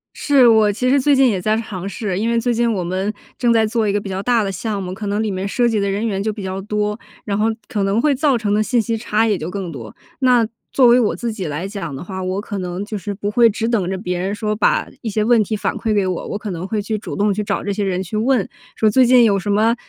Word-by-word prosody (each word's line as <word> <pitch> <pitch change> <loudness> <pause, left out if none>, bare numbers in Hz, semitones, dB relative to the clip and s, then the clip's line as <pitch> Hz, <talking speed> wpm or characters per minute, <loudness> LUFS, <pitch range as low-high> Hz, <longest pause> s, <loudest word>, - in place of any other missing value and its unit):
是， 275 -4 +4
我 220 -2 +5
其 240 +5 -2
实 280 0 +4
最 285 +2 +4
近 265 0 +5
也 200 -6 0
在 215 +3 +1
尝 200 -4 -5
试， 195 -3 -3
因 225 +2 0
为 235 0 +2
最 240 +1 0
近 235 0 +1
我 190 -5 -1
们 185 +4 -2 0.3
正 240 -2 +2
在 225 -1 +4
做 220 0 0
一 - - +2
个 205 - +1
比 200 - -8
较 190 0 -3
大 235 +1 +2
的 195 - -2
项 205 +2 -3
目， 185 -1 -5
可 205 +2 -6
能 205 +2 0
里 215 - -1
面 190 +1 -3
涉 240 +4 +1
及 225 -2 +1
的 200 0 0
人 200 +3 -1
员 195 -3 -1
就 215 +2 -1
比 210 -1 -7
较 190 0 -4
多， 210 +1 -2 0.3
然 200 - -1
后 215 +1 +2 0.2
可 220 -6 -2
能 195 +3 +1
会 295 +3 +3
造 275 -1 +2
成 210 -3 -1
的 210 - +2
信 240 +3 +1
息 230 +1 -1
差 220 0 0
也 210 -3 +1
就 160 0 -5
更 185 -2 -5
多。 115 -8 -9 0.2
那 250 -4 +4 0.2
作 265 - +4
为 240 +1 +6
我 220 -4 +1
自 235 -2 -3
己 195 -4 -5
来 150 +5 -4
讲 195 -8 -6
的 135 - -7
话， 190 0 -6
我 185 +1 -2
可 205 -1 -5
能 180 +2 -4
就 215 - -6
是 205 0 -4
不 205 +1 -3
会 235 +1 +5
只 225 +1 -2
等 210 -7 0
着 190 - -2
别 180 -2 -3
人 190 +3 -2
说 210 0 -2
把 210 - +2
一 225 - -3
些 215 +1 0
问 230 0 +4
题 215 +2 -3
反 - - -2
馈 225 - -2
给 200 -2 +2
我， 185 -2 -3
我 - - -3
可 210 -1 -6
能 175 +1 -5
会 215 +1 -1
去 215 +2 -2
主 - - -6
动 205 0 +1
去 210 +2 -2
找 200 -1 -2
这 200 - -2
些 205 - -2
人 185 -2 -1
去 185 +3 -7
问， 225 -1 +1 0.3
说 220 - +2
最 260 +4 +5
近 245 0 +6
有 200 -3 +3
什 205 +2 -2
么 220 +3 +3
210 Hz, 325 characters per minute, -19 LUFS, 195-230 Hz, 0.3 s, 为